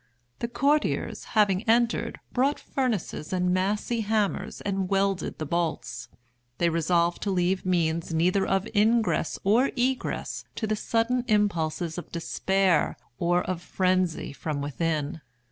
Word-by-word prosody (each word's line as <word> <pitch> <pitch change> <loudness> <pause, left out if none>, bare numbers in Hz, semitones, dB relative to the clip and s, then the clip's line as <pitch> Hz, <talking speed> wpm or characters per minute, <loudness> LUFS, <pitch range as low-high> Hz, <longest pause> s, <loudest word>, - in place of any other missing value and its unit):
The 235 - -1
courtiers, 285 +5 0
having 195 -3 +4
entered, 235 0 +2
brought 270 +4 +2
furnaces 230 - -2
and 180 -1 +1
massy 205 +5 0
hammers 215 -1 -1
and 195 -2 -2
welded 195 -1 0
the 155 - -4
bolts. 160 -6 -2 0.5
They 170 - +2
resolved 170 +1 +1
to 205 - -1
leave 185 0 0
means 170 -2 +1
neither 180 +4 +2
of 195 +2 +1
ingress 220 +2 +2
or 230 +7 +4
egress 255 +1 -1
to 220 - -2
the 215 0 0
sudden 230 +3 0
impulses 175 -6 0
of - - -11
despair 185 +1 +1 0.2
or 175 +1 +2
of 185 -2 -3
frenzy 185 -5 0
from 145 +2 -3
within. 150 +1 -2
190 Hz, 130 wpm, -27 LUFS, 170-215 Hz, 0.5 s, having